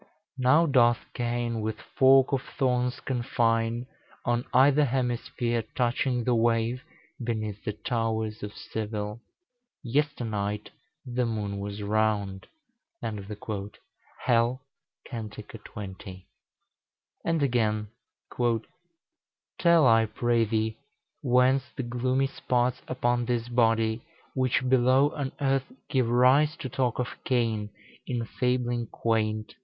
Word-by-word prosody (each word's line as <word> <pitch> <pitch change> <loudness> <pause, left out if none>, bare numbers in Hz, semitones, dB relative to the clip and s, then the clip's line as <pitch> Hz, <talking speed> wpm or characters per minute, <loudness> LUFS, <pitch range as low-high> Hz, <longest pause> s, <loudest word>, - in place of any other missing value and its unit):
Now 145 +6 +5
doth 120 -5 +4
Cain 120 -1 -1
with 110 0 -3
fork 135 +1 +4
of 135 -2 +1
thorns 125 -2 0
confine, 120 -2 0 0.4
On 120 0 +1
either 145 +3 +5
hemisphere, 120 -2 -1
touching 125 0 +1
the 125 - +2
wave 115 +1 +1 0.4
Beneath 110 -3 -3
the 105 - -2
towers 110 0 -2
of 105 - -5
Seville. 105 0 -5 0.6
Yesternight 115 -7 -1 0.3
The 125 -1 -1
moon 105 -3 -3
was 100 +1 -5
round." 105 -2 0 0.5
Hell, 110 +4 -3 0.4
cant. 110 -4 -6
xx. 100 -3 -9 1.0
And 165 -3 +1
again, 110 -5 +1 0.2
"... - - -20 1.2
Tell, 170 -4 +5
I 115 -2 +5
pray 115 +1 +1
thee, 110 0 -1 0.4
whence 130 0 +4
the 135 - -1
gloomy 125 +3 0
spots 125 -1 0
Upon 120 -1 0
this 120 -1 -1
body, 115 -1 +2 0.3
which 130 0 +1
below 130 +3 +4
on 140 -2 -3
earth 135 - 0 0.2
Give 130 -4 +1
rise 130 +6 +4
to 130 - -5
talk 125 -1 0
of 125 - -4
Cain 115 -4 0 0.4
in 120 -2 -2
fabling 120 -1 -1
quaint?" 110 -1 -1
120 Hz, 110 wpm, -27 LUFS, 110-130 Hz, 1.2 s, Now